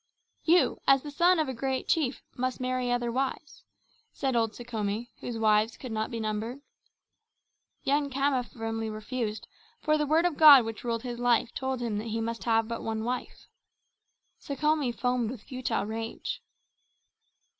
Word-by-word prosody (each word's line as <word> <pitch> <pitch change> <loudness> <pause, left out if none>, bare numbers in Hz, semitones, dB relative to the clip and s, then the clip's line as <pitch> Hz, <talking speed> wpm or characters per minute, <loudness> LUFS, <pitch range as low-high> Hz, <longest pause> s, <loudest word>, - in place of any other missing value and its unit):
"You, 345 +2 +4
as 270 -1 +5
the 295 - -6
son 345 +5 +4
of 310 -2 +1
a 260 - -3
great 260 +2 -2
chief, 285 -6 0
must 255 0 -2
marry 255 -1 -1
other 240 -1 0
wives," 270 +4 -3 0.5
said 265 -3 -1
old 225 -2 +1
Sekhome, 225 -1 -3
whose 240 -2 -5
wives 215 0 +3
could 255 - -7
not 220 0 -1
be 230 - -4
numbered. 220 +5 -3 1.2
Young 285 +1 +1
Khama 275 -1 +1
firmly 225 -1 -4
refused, 215 0 -4 0.3
for 305 0 +2
the 300 - 0
Word 320 +4 +3
of 350 -4 0
God 285 -6 +9
which 225 -1 -6
ruled 230 -2 -2
his 240 -2 -5
life 245 -1 +2
told 265 -1 -2
him 220 -3 -1
that 220 - -5
he 225 0 -2
must 230 0 -3
have 225 -1 +2
but 230 0 -4
one 220 0 -3
wife. 245 +1 -4 0.9
Sekhome 300 -2 0
foamed 245 -1 0
with 240 -3 -7
futile 255 -5 -2
rage. 225 +1 -4
245 Hz, 165 wpm, -28 LUFS, 225-270 Hz, 1.2 s, God